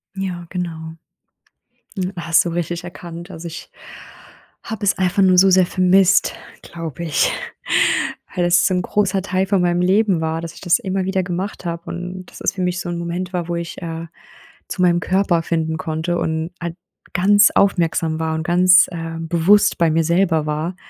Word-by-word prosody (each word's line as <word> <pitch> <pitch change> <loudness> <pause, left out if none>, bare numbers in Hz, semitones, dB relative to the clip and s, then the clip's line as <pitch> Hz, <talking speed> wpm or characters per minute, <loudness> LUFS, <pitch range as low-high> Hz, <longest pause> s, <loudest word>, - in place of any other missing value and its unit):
Ja, 185 -3 -4
genau. 165 -3 -5 1.0
Hm, 185 0 -2
hast 170 0 +2
du - - -1
richtig 175 0 -3
erkannt. 170 0 -9
Also, 170 -1 -8
ich 165 - -9 0.9
habe 220 -3 -5
es 195 - +2
einfach 185 +1 +1
nur 185 -1 +4
so 190 +2 +6
sehr 185 -1 +5
vermisst, 185 +1 +3 0.3
glaube 165 -2 -7
ich, 160 -3 +1 1.0
weil 180 - 0
das 175 0 +4
so - - +2
'n 180 - +1
großer 195 0 0
Teil 190 0 -1
von 195 -2 +2
meinem 175 0 +1
Leben 190 -1 +2
war, 160 0 -1
dass 165 0 -7
ich - - -14
das 175 -3 +2
immer 190 0 -2
wieder 190 0 0
gemacht 180 +2 -5
habe 170 0 -4
und 180 +1 -6
dass - - -14
es - - 0
für 195 - -5
mich 180 0 -1
so 175 - -5
'n 175 - -3
Moment 175 +2 -4
war, 175 -2 -2
wo 170 - -1
ich, 170 +1 -6
äh, 165 -1 -5 0.6
zu 185 - -3
meinem 175 -1 +4
Körper 185 -2 +1
finden 160 -1 -1
konnte 170 -1 -2
und 160 0 -2
halt 170 -1 -4 0.4
ganz 205 +2 +5
aufmerksam 165 -4 +1
war 160 0 -1
und 160 - -3
ganz, 180 +1 +5
äh, 165 -1 -5
bewusst 170 +5 +3
bei 165 -2 +2
mir 165 +1 +2
selber 170 -2 +1
war. 155 +4 -3
175 Hz, 185 wpm, -20 LUFS, 165-185 Hz, 1.0 s, so